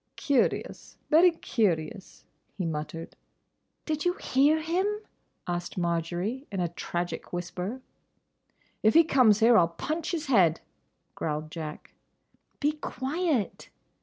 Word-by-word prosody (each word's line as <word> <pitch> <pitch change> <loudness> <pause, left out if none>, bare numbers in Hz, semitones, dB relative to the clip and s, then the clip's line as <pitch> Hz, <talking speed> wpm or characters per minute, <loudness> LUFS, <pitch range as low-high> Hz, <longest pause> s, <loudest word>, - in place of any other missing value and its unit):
"Curious, 280 -3 0
very 335 +4 +7
curious," 195 - -2 0.3
he 185 - -2
muttered. 160 +1 -5 0.7
"Did 310 -1 -2
you 355 - +2
hear 290 0 +2
him?" 340 +5 0 0.6
asked 175 +1 -4
Marjory, 175 - -2
in 195 - -3
a 175 -1 0
tragic 175 0 -4
whisper. 180 +7 -4 1.0
"If 220 +4 +4
he 330 - +9
comes 250 -9 +4
here 235 +1 +6
I 215 - +7
'll 170 - +3
punch 320 +1 -2
his 330 -3 -2
head," 185 - +4 0.5
growled 155 0 -3
Jack. 155 -2 -7 0.7
"Be 295 +1 +2
quiet!" 300 - -2
215 Hz, 120 wpm, -28 LUFS, -, 1.0 s, he